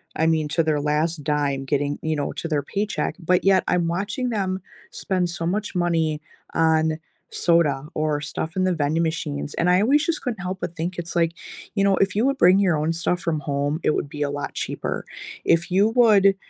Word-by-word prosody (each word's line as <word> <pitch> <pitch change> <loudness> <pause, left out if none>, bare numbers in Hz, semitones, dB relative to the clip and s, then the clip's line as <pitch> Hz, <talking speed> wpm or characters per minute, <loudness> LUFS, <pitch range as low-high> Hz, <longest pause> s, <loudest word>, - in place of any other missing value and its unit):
I 160 - +1
mean, 160 -2 +2
to 165 +2 +1
their 155 -2 +1
last 150 +2 0
dime 145 -2 0
getting, 145 0 -1
you 160 0 -1
know, 145 -1 -2
to - - -4
their 150 -3 0
paycheck. 205 +8 -2
But 180 +1 +1
yet, 190 -1 +4
I'm 175 -2 +1
watching 205 +8 -2
them 190 -4 -2 0.3
spend 185 -2 -1
so 170 -1 -4
much 205 +4 -2
money 165 -3 0 0.3
on 160 -1 +2 0.3
soda 150 -5 +2
or 155 -1 0
stuff 160 +2 -4
in 185 - +2
the 185 - +2
vending 160 +1 0
machines, 70 - -3
and 175 - +1
I 180 +1 +5
always 280 +7 +3
just 335 -2 -1
couldn't 235 -6 -4
help 185 0 -4
but 175 -1 -4
think 170 +2 -3
it's 175 0 -6
like, 165 -1 +2 0.4
you 200 - +1
know, 200 -1 +4
if 195 -1 +2
you 220 +4 +2
would 275 0 +1
bring 185 -3 +6
your 185 -5 +3
own 155 +2 0
stuff 175 +1 -1
from 160 -2 -1
home, 145 +1 -1
it - - +3
would 145 - -2
be 150 - -7
a 145 - +1
lot 145 0 -4
cheaper. - - -4 0.4
If 170 +2 +2
you 195 +3 +4
would, 205 -5 +5
165 Hz, 215 wpm, -23 LUFS, 150-190 Hz, 0.4 s, bring